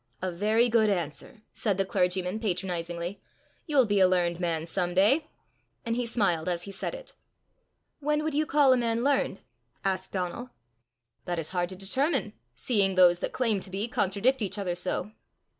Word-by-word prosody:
"A 185 0 -2
very 215 +7 +2
good 225 -2 +3
answer!" 185 - -4
said 205 -4 -1
the 195 - +1
clergyman 185 0 0
patronizingly. 175 -2 -3 0.5
"You'll 285 -5 +4
be 205 -2 +1
a 185 - +6
learned 175 -2 +1
man 165 -3 -1
some 175 0 -2
day!" 265 - +4 0.6
And 230 0 -1
he 245 -1 -1
smiled 185 -8 +1
as 175 -1 -2
he 200 - -8
said 195 - -4
it. - - -10 0.9
"When 300 +1 0
would 315 -1 -2
you 305 +1 +1
call 285 -3 +5
a - - +3
man 235 -1 0
learned?" 280 0 +1 0.4
asked 190 -1 -1
Donal. 190 +7 -3 0.8
"That 175 -1 -2
is 160 -2 -4
hard 175 -1 -1
to 190 - -6
determine, 255 - -1 0.2
seeing 195 - +1
those 175 -1 +6
that - - -3
claim 230 -6 +1
to 190 - -8
be 195 +4 -3
contradict 230 +4 +1
each 205 -1 -2
other 190 -3 -2
so." 180 +3 -2
195 Hz, 175 wpm, -28 LUFS, 180-240 Hz, 0.9 s, a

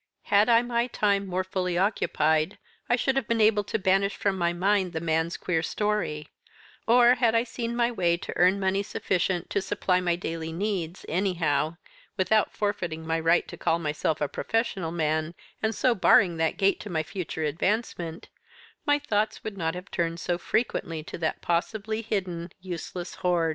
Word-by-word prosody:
Had 205 +3 +5
I 235 - +6
had 240 - +2
my 235 0 +1
time 200 -4 +1
more 185 0 -1
fully 180 -1 -2
occupied 160 -4 +1 0.3
I 240 - +5
should 265 +2 0
have 270 -5 0
been 230 -1 +1
able 210 -1 +4
to - - -1
banish 195 0 +2
from 200 -1 0
my 170 -2 +1
mind 185 +1 +1
the 160 - -2
man's 160 +1 0
queer 165 -3 0
story; 190 -6 -1 0.6
or 240 +1 +6
had 240 -3 +2
I 230 - +4
seen 235 -1 -4
my 240 0 +2
way 175 -6 +1
to - - -6
earn 185 +3 +4
money 195 0 +1
sufficient 185 -3 -1
to 200 - +1
supply 185 -1 0
my 175 -1 +1
daily 165 -2 -4
needs, 180 -1 -3
anyhow, 165 -4 0 0.4
without 215 +3 +2
forfeiting 175 -6 -3
my 165 0 0
right 165 +2 +3
to - - -9
call 165 - +1
myself 155 -1 -1
a 150 - +2
professional 200 - -2
man, 155 0 -1 0.3
and 220 0 0
so 255 - +3
barring 185 -4 +4
that 160 -1 0
gate 195 0 +2
to 210 - -8
my 160 -3 0
future 160 -1 -5
advancement; 170 +1 -2 0.6
my 290 0 +5
thoughts 215 -6 -1
would 215 -2 -5
not 165 -2 -2
have 180 +2 -9
turned 170 0 -1
so 175 0 -1
frequently 170 -7 -1
to - - -7
that 160 -1 -2
possibly 215 +5 -1
hidden, 185 -6 -3
useless 180 0 -6
hoard. 175 -2 +2
185 Hz, 180 wpm, -27 LUFS, 165-210 Hz, 0.6 s, I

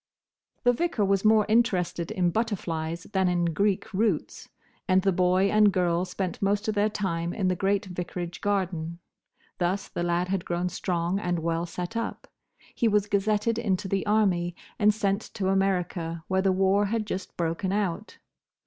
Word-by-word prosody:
The 245 -1 +5
Vicar 250 -6 0
was 195 0 +1
more 215 -1 +5
interested 190 -7 +1
in 175 -2 +1
butterflies 170 -7 -2
than 190 -1 +2
in 175 -1 +1
Greek 200 +2 0
roots, 200 -4 -1 0.4
and 185 0 +3
the 195 - +3
boy 185 +2 +2
and 210 -1 +5
girl 175 -1 +1
spent 185 0 -4
most 205 +2 +1
of 215 - +1
their 210 +1 +2
time 175 -5 -2
in 190 -3 +1
the 185 - +1
great 195 +2 0
vicarage 175 -2 -5
garden. 180 -5 -1 0.6
Thus 190 +3 0
the - - -5
lad 175 +1 0
had 190 -2 -1
grown 175 +1 -1
strong 180 +1 -1
and 175 -3 -1
well 165 +1 -1
set 180 +5 -5
up. 230 - -4 0.5
He 235 - +1
was 210 -2 +3
gazetted 210 +2 +1
into 195 -4 -1
the 195 0 0
Army, 185 -5 +2 0.2
and 210 0 +5
sent 200 -1 0
to 190 -2 0
America, 180 -4 0
where 190 0 +1
the 190 0 +3
war 195 +2 +3
had 220 +1 -1
just 190 -2 -5
broken 170 +3 -1
out. 200 0 -2
190 Hz, 170 wpm, -27 LUFS, 175-205 Hz, 0.6 s, The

